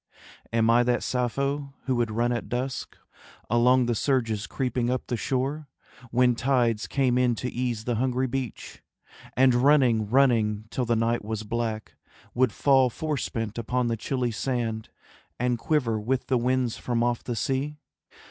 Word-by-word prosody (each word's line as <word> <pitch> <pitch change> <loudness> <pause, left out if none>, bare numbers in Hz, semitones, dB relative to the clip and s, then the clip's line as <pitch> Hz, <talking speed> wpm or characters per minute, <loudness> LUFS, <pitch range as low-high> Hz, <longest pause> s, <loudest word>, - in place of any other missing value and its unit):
Am 115 -1 +2
I 115 +1 +5
that 120 0 +1
Sappho 140 +3 -2
who 130 - 0
would 120 -2 +1
run 120 +3 0
at 120 - -3
dusk 130 +1 -4 0.5
Along 125 +2 +4
the 120 - 0
surges 115 -4 0
creeping 125 -2 -1
up 130 0 -1
the 120 - -2
shore 135 +5 -2 0.4
When 125 +1 +3
tides 120 -3 +1
came 130 -3 +1
in 125 -2 +2
to 125 +2 -4
ease 120 -3 -2
the 120 -1 -1
hungry 130 +1 0
beach, 130 -3 -5 0.6
And 130 0 +5
running, 120 -5 +3
running, 110 -5 +3
till 125 - -1
the 120 0 +1
night 115 +1 0
was 110 0 -4
black, 110 0 -4 0.4
Would 125 -1 +2
fall 135 0 +3
forespent 120 -6 -3
upon 125 +1 -1
the 115 - 0
chilly 125 +2 -2
sand 115 -2 -2 0.5
And 125 -1 0
quiver 120 -6 0
with 125 +4 -1
the 130 - +1
winds 125 -1 0
from 120 -1 -1
off 120 -1 0
the 120 - -3
sea? 135 +6 -2
120 Hz, 160 wpm, -26 LUFS, 115-130 Hz, 0.6 s, I